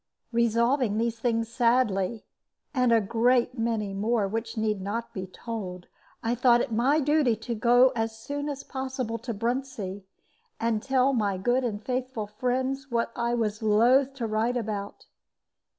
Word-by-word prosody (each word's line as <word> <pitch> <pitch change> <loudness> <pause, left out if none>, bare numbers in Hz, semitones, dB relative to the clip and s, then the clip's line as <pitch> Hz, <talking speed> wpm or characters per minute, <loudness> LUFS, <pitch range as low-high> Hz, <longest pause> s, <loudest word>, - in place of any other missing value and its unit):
Revolving 235 0 +2
these 230 0 -1
things 230 -1 0
sadly, 230 -3 +1 0.5
and 250 -3 +2
a 230 - +6
great 240 +4 +1
many 225 -3 -1
more 210 +1 +1
which 225 +3 -4
need 215 -2 0
not 225 +4 -4
be 190 -1 -5
told, 185 -3 -6 0.4
I 230 +1 +1
thought 245 0 +4
it 240 - -2
my 255 +7 +3
duty 295 -4 +3
to 225 +2 -5
go 245 +3 +5
as 225 -1 -2
soon 285 +5 -4
as 280 -1 -5
possible 260 -4 -4
to 240 +1 -5
Bruntsea, 230 -3 -3 0.6
and 225 -2 0
tell 265 +1 +2
my 205 -6 0
good 245 +7 +1
and 215 -3 -3
faithful 255 -3 -2
friends 255 +6 -2
what 230 -1 0
I 235 0 0
was 215 -2 -1
loath 245 +6 +4
to 245 -4 -3
write 225 +3 0
about. 210 -3 -5
235 Hz, 155 wpm, -27 LUFS, 215-255 Hz, 0.6 s, a